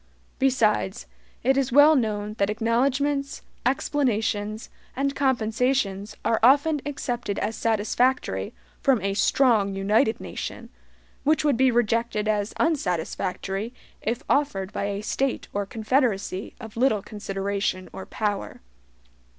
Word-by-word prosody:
Besides, 225 -7 +1 0.4
it 265 +3 +3
is 270 -1 +1
well 290 +4 +7
known 210 -4 -1
that 200 0 +2
acknowledgments, 275 +6 0 0.2
explanations, 225 -6 -1 0.2
and 275 +1 -1
compensations 225 -5 0
are 225 - +2
often 285 +5 +4
accepted 240 -7 -3
as 220 +2 -2
satisfactory 230 +4 0 0.3
from 270 -4 +3
a 195 0 0
strong 210 -3 +3
united 215 +5 +2
nation, - - -7 0.5
which 305 +1 +2
would 290 -3 +3
be 260 +2 +4
rejected 230 -2 +1
as 210 0 0
unsatisfactory 195 - -1 0.3
if 235 +6 -2
offered 205 -10 0
by - - -2
a 200 0 -3
State 270 +4 -1
or 200 -1 -2
confederacy 220 -4 -1
of 220 -3 -10
little 230 -4 +2
consideration 200 -2 -3
or 190 - -8
power. 205 -2 -3
225 Hz, 120 wpm, -25 LUFS, 205-270 Hz, 0.5 s, well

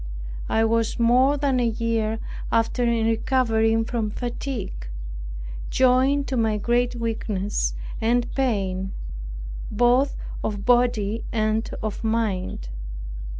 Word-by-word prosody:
I 225 0 +3
was 230 0 +1
more 255 +5 +4
than 275 -3 +2
a 240 - +3
year 225 -1 0 0.3
after 230 +2 +2
in 235 -2 +2
recovering 225 -1 +2
from 225 -2 -1
fatigue, 235 - -4 0.8
joined 260 +2 +3
to 260 - 0
my 220 -2 +2
great 240 +3 +1
weakness 215 -4 -1 0.3
and 235 +2 +1
pain 195 -7 0 0.8
both 245 +5 +3 0.3
of 205 -2 -2
body 235 -3 +3
and 215 0 +1
of 215 +1 -3
mind. 205 - -1
230 Hz, 110 wpm, -24 LUFS, 215-245 Hz, 0.8 s, more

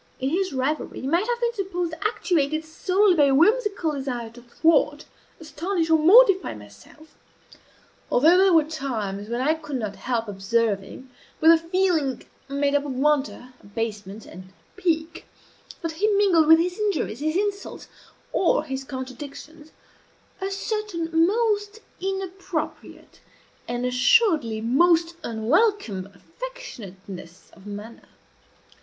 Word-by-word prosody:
In 265 +1 -1
his 375 +3 0
rivalry 275 +3 -2
he - - -6
might 340 +9 +1
have 480 -1 -1
been 475 -1 0
supposed 360 -5 -3
actuated 315 -7 0
solely 370 +5 +2
by 300 -4 +4
a 275 -1 +3
whimsical 400 - +2
desire 255 -5 -4
to 240 +1 -14
thwart, 295 +4 +1 0.3
astonish, 330 +1 -2
or 320 - +5
mortify 385 - +5
myself; 105 - -16 1.0
although 315 +8 +5
there 380 +1 +5
were 325 -2 +5
times 225 -10 -4
when 240 +1 -2
I 300 +4 +2
could 310 -3 -7
not 215 -5 -4
help 235 -3 -2
observing, 205 +4 -2 0.3
with 320 +1 +7
a 330 - +7
feeling 330 -6 0 0.3
made 280 0 0
up 285 0 +2
of 285 -2 -4
wonder, 270 -2 0
abasement, 205 0 -5
and 185 +1 -12 0.2
pique, 335 -3 -2 0.6
that 330 - -2
he 360 +7 0
mingled 395 -7 +3
with 320 +1 +8
his 360 +4 -1
injuries, 400 - -1
his 310 +2 -1
insults, 405 0 -3 0.5
or 345 - +2
his 270 -3 -5
contradictions, 280 +4 -9 0.7
a 385 - -2
certain 350 -5 -1
most 420 0 0 0.2
inappropriate, 380 -3 -5 0.5
and 245 +1 -3
assuredly 250 - +3
most 335 +8 +3
unwelcome, 230 - 0
affectionateness 195 - -10
of 195 +1 -16
manner. 205 +3 -9
310 Hz, 130 wpm, -24 LUFS, 245-370 Hz, 1.0 s, with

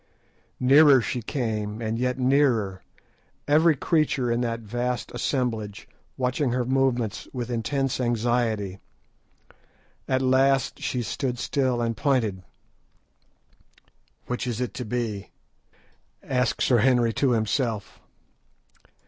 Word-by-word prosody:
Nearer 140 +1 +7
she 125 +1 -3
came, 110 -4 -3
and 115 0 -2
yet 125 0 0
nearer, 125 -8 +2 0.7
every 155 +2 +4
creature 140 -5 +1
in 120 +1 0
that 115 -1 -2
vast 120 +3 -3
assemblage 110 -6 -2 0.3
watching 125 0 0
her 125 -1 0
movements 125 -4 0
with 125 -2 -4
intense 130 +3 -1
anxiety. 115 -5 0 1.3
At 130 0 +1
last 135 0 +2
she 125 -1 -2
stood 125 +2 -3
still 130 -2 0
and 115 -1 -1
pointed. 110 -7 0 1.8
"Which 125 0 -3
is 120 -2 -3
it 125 -2 -3
to 125 - -5
be?" 110 -3 -3 0.9
asked 125 -2 0
Sir 120 -2 +4
Henry 120 -1 +3
to 130 0 +2
himself. 110 -1 -1
125 Hz, 110 wpm, -25 LUFS, 115-130 Hz, 1.8 s, Nearer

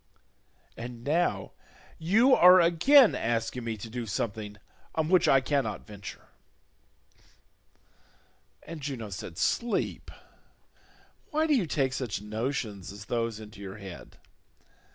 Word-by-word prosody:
And 120 0 -8
now 145 - 0 0.5
you 220 +11 +4
are 180 -2 +8
again 210 - +6
asking 115 +2 -2
me 115 -1 -3
to 105 - -8
do 115 0 -5
something 105 +1 -4 0.4
on 160 0 0
which 185 -1 +4
I 135 -1 +5
cannot 135 -5 -1
venture." 100 -2 -10 2.3
And 165 -1 -8
Juno 130 -7 -5
said, 90 -3 -7
"Sleep, 240 0 -1 1.2
why 310 +1 +1
do 310 - +2
you 205 -10 +1
take 135 -4 0
such 120 -7 -3
notions 110 -2 -4
as 100 +1 -10
those 115 -2 -2
into 105 -2 -11
your 95 0 -7
head? 95 -4 -11
120 Hz, 120 wpm, -28 LUFS, 105-165 Hz, 2.3 s, are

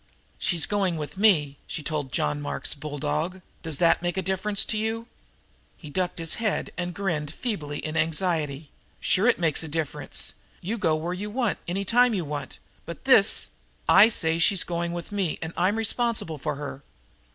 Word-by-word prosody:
"She's 170 -3 +2
going 195 -5 0
with 150 +2 -5
me," 165 -9 +3
she 155 - -5
told 145 -3 -3
John 75 -9 0
Mark's 70 -1 -2
bulldog. 150 +5 -3 0.2
"Does 160 -4 -3
that 170 +1 +4
make 175 0 -2
a 190 - 0
difference 190 +2 +2
to - - -2
you?" 225 +1 -2 0.7
He 150 -4 -10
ducked 180 +2 -1
his 165 +5 -2
head 215 -3 0
and 175 0 -3
grinned 160 -7 -2
feebly 155 - -3
in 155 +1 -4
his 160 - +3
anxiety. 155 -3 -1 0.3
"Sure 200 +6 +3
it 245 - +4
makes 165 -3 +1
a 160 - -5
difference. 155 -1 -3 0.3
You 220 +6 -3
go 165 -6 +2
where 165 +3 -2
you 200 +3 -4
want, 235 -1 0
any 195 +3 -2
time 245 +2 +4
you 180 -4 -1
want, 145 -2 -5 0.3
but 170 - -8
this 220 -6 +5 0.2
" - - -36
"I 220 - +9
say 165 -6 +1
she's 180 +1 +4
going 170 0 -2
with 175 +2 -6
me, 195 -5 -1
and 160 +1 -5
I'm 190 +4 +2
responsible 225 -7 0
for 150 +2 -2
her." 140 -1 -6
170 Hz, 185 wpm, -26 LUFS, 155-200 Hz, 0.7 s, I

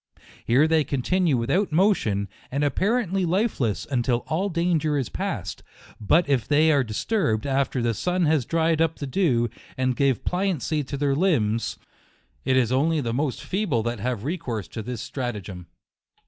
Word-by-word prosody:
Here 130 +7 +4
they 160 -1 +3
con 135 -2 -3
tinue 180 -4 +2
without 175 - 0
motion, 150 - +2 0.2
and 140 +3 -1
apparently 195 - +1
lifeless, 175 - 0
until 120 -2 0
all 185 +6 0
danger 165 -4 +1
is 130 -6 -2
past, - - -4 0.4
But 155 - +3
if 135 -6 +1
they 155 +2 +4
are 140 -3 +3
dis 110 -3 -4
turbed 150 - +1
after 135 -2 0
the 115 -1 +1
sun 180 - 0
has 155 -3 +2
dried 165 +3 +1
up 165 -1 +2
the 145 - -5
dew, 130 -6 +1 0.3
and 130 -1 +1
gave 135 -2 +1
pliancy 180 -5 0
to 140 - -4
their 140 -1 +1
limbs, 120 - +1 0.7
it 130 - +3
is 125 -2 +2
only 155 +5 +2
the 115 -5 -2
most 135 0 -2
feeble 175 - -1
that 120 -1 -3
have 120 -1 -2
recourse 130 - -3
to 110 - -6
this 120 0 -5
strata 120 -5 -4
gem. 90 -3 -9
140 Hz, 175 wpm, -24 LUFS, 120-165 Hz, 0.7 s, Here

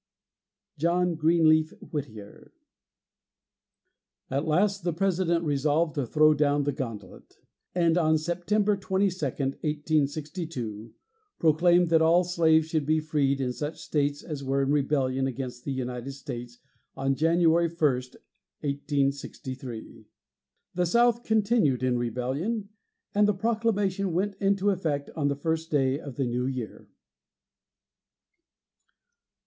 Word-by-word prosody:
JOHN 175 +2 +2
GREENLEAF 160 -1 +3 0.2
WHITTIER. 110 -9 -7 1.8
At 140 +4 -1
last 195 +4 +1
the 175 -1 0
President 170 -2 0
resolved 150 +2 +1
to 140 -5 -2
throw 155 +4 +5
down 145 -1 +2
the 145 - 0
gauntlet, 115 -8 -8 0.4
and 170 -1 +3
on 155 -1 +3
September 180 +6 0
22, 190 -2 -1
1862, 145 - -2 0.4
proclaimed 170 +2 +4
that 165 -1 +4
all 170 +3 +5
slaves 160 -3 +3
should 155 -3 -1
be 155 0 +3
freed 145 -3 0
in 125 -2 -1
such 150 +4 -5
states 145 -1 -1
as 150 -4 -6
were 135 +1 0
in 135 - 0
rebellion 135 -2 +1
against 125 -1 -6
the 140 - -2
United 125 0 -4
States 120 -3 -8 0.4
on 135 0 +1
January 165 +2 +3
1, 170 +1 -12
1863. 140 -2 -3 0.7
The 180 0 +1
South 235 +4 +3
continued 215 - +2
in 125 -1 +1
rebellion, 135 - -2 0.4
and 205 0 +4
the 210 - +1
proclamation 205 -3 0
went 195 +4 0
into 200 0 +2
effect 155 -7 -2
on 150 -3 0
the 140 - 0
first 160 +3 -2
day 135 -2 +1
of 140 -5 -9
the 135 - -1
new 125 +1 -1
year. 125 -5 -6
155 Hz, 120 wpm, -27 LUFS, 135-175 Hz, 1.8 s, throw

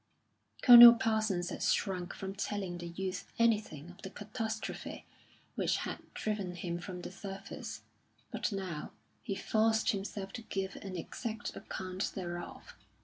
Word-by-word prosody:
Colonel 240 -1 +12
Parsons 215 -6 0
had - - -5
shrunk 185 -2 0
from 195 0 -5
telling 195 -3 -3
the 175 - -6
youth 185 +2 -4
anything 210 -9 +1
of 180 - -16
the 190 - -6
catastrophe 220 +2 -5 0.5
which - - +1
had - - -4 0.2
driven 200 -4 -2
him 170 0 -3
from 180 0 -7
the - - -6
service; 195 0 -7 0.5
but - - -1
now 185 -6 -4 0.3
he 200 - -3
forced 220 +2 +2
himself 195 -1 -5
to 235 - -5
give 195 -3 -3
an 190 -2 -6
exact 220 +6 -5
account 185 0 -4
thereof. 175 -2 -6
195 Hz, 140 wpm, -33 LUFS, 180-215 Hz, 0.5 s, Colonel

